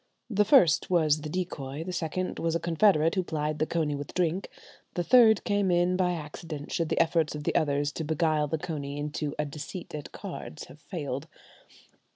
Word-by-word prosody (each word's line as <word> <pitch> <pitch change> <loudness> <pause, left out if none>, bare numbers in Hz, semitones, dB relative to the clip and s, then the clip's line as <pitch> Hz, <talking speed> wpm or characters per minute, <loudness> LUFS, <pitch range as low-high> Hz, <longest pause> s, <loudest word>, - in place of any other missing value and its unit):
The 210 0 +3
first 210 - +5
was 155 -4 +3
the 150 - -5
decoy, 155 -4 -4
the 180 +2 -5
second 175 +2 -2
was 165 0 0
a - - +1
confederate 165 -1 +3
who 190 - +1
plied 155 -3 -2
the 155 - +1
coney 160 -3 0
with 145 0 -6
drink, 180 +1 0 0.5
the 175 - 0
third 225 0 +6
came 205 -2 +1
in 175 +1 +3
by 180 -1 +1
accident 150 -1 -7
should 165 -2 -1
the - - 0
efforts 165 -2 +2
of 150 - -5
the - - 0
others 145 -1 +1
to 160 - -4
beguile 155 -1 +1
the 160 - -1
coney 145 -3 -5
into 150 0 -3
"a 150 - 0
deceit 150 +5 -7
at 150 -1 -6
cards" 75 - -7
have 150 - -14
failed. 145 -3 -5
160 Hz, 195 wpm, -28 LUFS, 150-180 Hz, 0.5 s, third